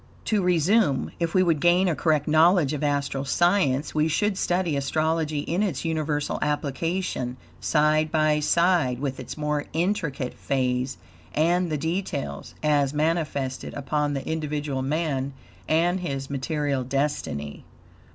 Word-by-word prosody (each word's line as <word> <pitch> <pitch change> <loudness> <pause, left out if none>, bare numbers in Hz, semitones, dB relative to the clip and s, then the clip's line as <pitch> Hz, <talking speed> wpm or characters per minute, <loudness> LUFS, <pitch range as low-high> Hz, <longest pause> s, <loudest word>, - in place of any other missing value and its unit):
To 215 -2 +1
resume. 180 -2 +2
If 170 +1 -1
we 185 - +5
would 165 -4 +2
gain 175 +4 +4
a 175 - +2
correct 155 -3 +1
knowledge 160 -1 +4
of 150 - -3
astral 140 -2 0
science 155 -2 +2
we 155 0 +2
should 200 +6 +1
study 175 -4 0
astrology 155 +2 0
in 170 +6 -1
its 180 -8 -1
universal 155 -2 -1
application, 150 -2 -2 0.2
side 155 0 +2
by 155 -1 +3
side 170 -4 +2
with 135 -1 -3
its 130 - -7
more 150 -1 -1
intricate 165 -7 -1
phase 130 -1 -1 0.4
and 175 +3 +2
the 155 - 0
details, 160 -1 -3
as 145 -2 +2
manifested 150 -4 -1
upon 145 +1 -1
the 135 - -4
individual 150 -3 -2
man 140 -1 -1 0.3
and 175 +4 +2
his 140 -6 -4
material 140 -1 -1
destiny. 130 - -2
150 Hz, 135 wpm, -25 LUFS, 140-170 Hz, 0.4 s, we